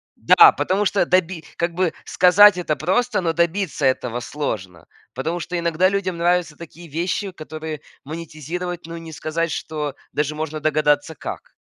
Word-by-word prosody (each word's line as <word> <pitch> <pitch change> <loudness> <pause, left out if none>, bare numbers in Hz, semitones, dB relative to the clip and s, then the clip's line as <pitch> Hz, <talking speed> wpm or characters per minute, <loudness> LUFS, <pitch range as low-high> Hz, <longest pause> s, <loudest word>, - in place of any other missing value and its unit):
да, 425 -2 +7
потому 195 +3 0
что 200 -2 +2
доби 180 -1 +1
как 170 0 -1
бы 180 -1 +1
сказать 185 +2 +6
это 165 -4 -1
просто, 190 - +1
но 170 -3 0
добиться 170 -2 0
этого 125 -2 0
сложно. 105 - -5 0.3
Потому 160 +7 -3
что 180 0 -3
иногда 170 +2 +2
людям 190 -3 -2
нравятся 175 -2 +1
такие 170 +2 -12
вещи, 175 +6 -2
которые 155 -2 -7 0.2
монетизировать, 165 +3 -6
но 165 0 -7
не 165 -1 -9
сказать, 155 +3 -2
что 150 -3 -4 0.2
даже 150 +1 -1
можно 155 0 -4
догадаться 150 0 +1
как. - - -8
165 Hz, 155 wpm, -21 LUFS, 155-180 Hz, 0.3 s, да